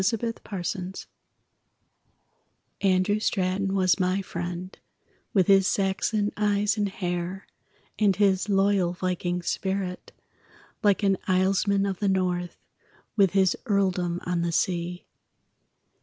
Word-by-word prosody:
_ 195 +5 +2
ANDREW 230 +1 -1
STRATON 190 -3 -5 1.9
Andrew 195 +1 +2
Straton 195 -1 0
was 185 0 +3
my 185 +1 +1
friend, 175 +1 -6 0.5
With 190 -5 +3
his 195 0 +5
Saxon 205 +2 0
eyes 210 0 +1
and 205 -2 0
hair, 180 0 -4 0.5
And 205 -3 +3
his 195 0 +2
loyal 195 -3 +2
viking 180 -1 -2
spirit, 190 0 -3 0.7
Like 205 -1 +2
an 195 -1 +3
islesman 195 +1 +2
of 190 -2 -3
the 205 - +1
North 180 -2 -1 0.6
With 195 -4 +3
his 190 -2 +3
earldom 185 -4 +1
on 180 -1 0
the 170 0 -1
sea. 175 +1 -1
190 Hz, 115 wpm, -26 LUFS, 180-200 Hz, 1.9 s, his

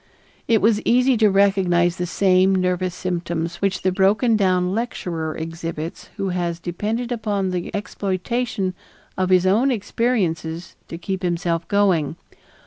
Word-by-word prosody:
It 225 -3 +3
was 215 -1 +3
easy 250 +2 +3
to 215 -1 +4
recognize 185 -3 +2
the 180 - -2
same 190 +1 +3
nervous 180 -1 0
symptoms 170 -2 -3
which 195 -2 -1
the 185 - +2
broken 205 +5 +3
down 185 -3 +2
lecturer 170 -8 -3
exhibits 165 0 -6
who 195 -2 -1
has 175 -2 -2
depended 215 +8 -3
upon 205 -5 -1
the 180 -1 -3
exploitation 200 0 -2 0.4
of 185 -1 0
his 185 -1 +4
own 220 +9 +3
experiences 190 -8 -1
to 165 - -7
keep 190 +2 -4
himself 170 -2 -1
going. 185 -7 +2
185 Hz, 135 wpm, -22 LUFS, 175-205 Hz, 0.4 s, to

